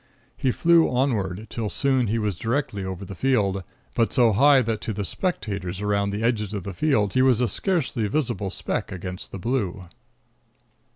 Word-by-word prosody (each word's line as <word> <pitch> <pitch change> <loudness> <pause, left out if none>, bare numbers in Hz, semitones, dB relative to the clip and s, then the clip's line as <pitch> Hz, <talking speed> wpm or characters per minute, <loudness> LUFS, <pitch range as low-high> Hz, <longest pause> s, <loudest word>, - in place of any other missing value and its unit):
He 130 - 0
flew 165 +5 +4
onward, 110 -7 0
till 110 -3 -3
soon 130 -1 +1
he 110 +3 0
was 105 -4 -1
directly 115 - -2
over 95 +1 -5
the 100 - -8
field, 100 -5 +1 0.3
but 115 - +1
so 120 -4 +4
high 135 +5 +5
that 110 -2 -2
to 110 - -3
the 100 0 -3
spectators 100 - -3
around 100 -1 0
the 105 +2 -3
edges 105 -3 0
of 100 - -4
the 100 - -5
field 105 - +1
he 130 - +3
was 130 -3 +4
a 125 - +2
scarcely 135 - 0
visible 105 -6 -1
speck - - -3
against 90 0 -6
the - - -5
blue. 100 -3 -2
110 Hz, 180 wpm, -24 LUFS, 100-130 Hz, 0.3 s, high